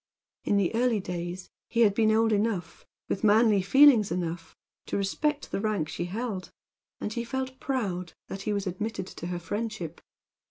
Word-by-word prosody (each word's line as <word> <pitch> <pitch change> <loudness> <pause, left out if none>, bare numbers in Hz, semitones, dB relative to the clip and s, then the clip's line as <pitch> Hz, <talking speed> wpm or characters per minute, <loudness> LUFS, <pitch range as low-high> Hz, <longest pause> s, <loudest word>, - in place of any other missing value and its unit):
In 205 - +2
the 195 -1 +1
early 235 -1 +2
days 180 0 -5 0.2
he 235 - +1
had 210 -3 +6
been 220 +1 +3
old 225 +1 +3
enough, 205 -5 -1 0.2
with 195 - -2
manly 215 -1 +5
feelings 240 +1 +6
enough, 170 -2 -4 0.3
to - - -1
respect 290 +10 -1
the - - -1
rank 205 -8 0
she 175 - -3
held, 200 0 -4 0.5
and 210 - -3
he 235 - -2
had 235 - -8
felt 260 -1 -3
proud 190 -10 -2
that 195 - -6
he 210 - -2
was 200 -1 -1
admitted 195 +2 -3
to 170 - -7
her 180 0 -2
friendship. 185 -1 -4
205 Hz, 175 wpm, -28 LUFS, 180-230 Hz, 0.5 s, had